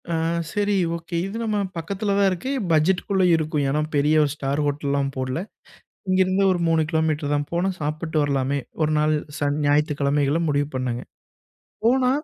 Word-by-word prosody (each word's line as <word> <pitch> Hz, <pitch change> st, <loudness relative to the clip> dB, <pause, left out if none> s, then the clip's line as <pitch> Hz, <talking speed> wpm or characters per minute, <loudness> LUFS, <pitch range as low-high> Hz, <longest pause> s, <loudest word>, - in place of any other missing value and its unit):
அ -, -, -1 dB, 0.4 s
சரி, 205 Hz, 0 st, 0 dB, 0.2 s
ஓகே. 170 Hz, +1 st, -6 dB
இது 195 Hz, +3 st, -6 dB
நம்ம 215 Hz, -2 st, 0 dB, 0.2 s
பக்கத்துல 200 Hz, +5 st, -2 dB
தான் 200 Hz, -1 st, +4 dB
இருக்கு. 185 Hz, +9 st, -3 dB, 0.2 s
பட்ஜெட்டுக்குள்ள 185 Hz, +4 st, +2 dB
இருக்கும். 155 Hz, -2 st, -1 dB
ஏன்னா, 150 Hz, +2 st, +1 dB
பெரிய 145 Hz, +2 st, +3 dB
1 145 Hz, -, 0 dB
ஸ்டார் 140 Hz, 0 st, -2 dB
ஹோட்டல்லாம் 140 Hz, -1 st, -1 dB
போடல. 130 Hz, +2 st, -2 dB, 0.7 s
இங்கேருந்து 185 Hz, +1 st, +3 dB
ஒரு 175 Hz, -, -1 dB
3 165 Hz, -1 st, +3 dB
கிலோமீட்டர் 155 Hz, -3 st, 0 dB
தான். 145 Hz, 0 st, -1 dB
போனா 175 Hz, +3 st, +1 dB
சாப்பிட்டு 155 Hz, +2 st, -3 dB
வரலாமே. 140 Hz, -1 st, 0 dB, 0.2 s
1 155 Hz, 0 st, +2 dB
நாள் 155 Hz, +1 st, +2 dB, 0.2 s
சன் 145 Hz, 0 st, 0 dB
ஞாயித்துக்கிழமைகள்ல 145 Hz, 0 st, +2 dB
முடிவு 145 Hz, -1 st, +1 dB
பண்ணேங்க. 125 Hz, -2 st, -2 dB, 0.8 s
போனா, 250 Hz, +2 st, +4 dB
155 Hz, 150 wpm, -23 LUFS, 145-185 Hz, 0.8 s, தான்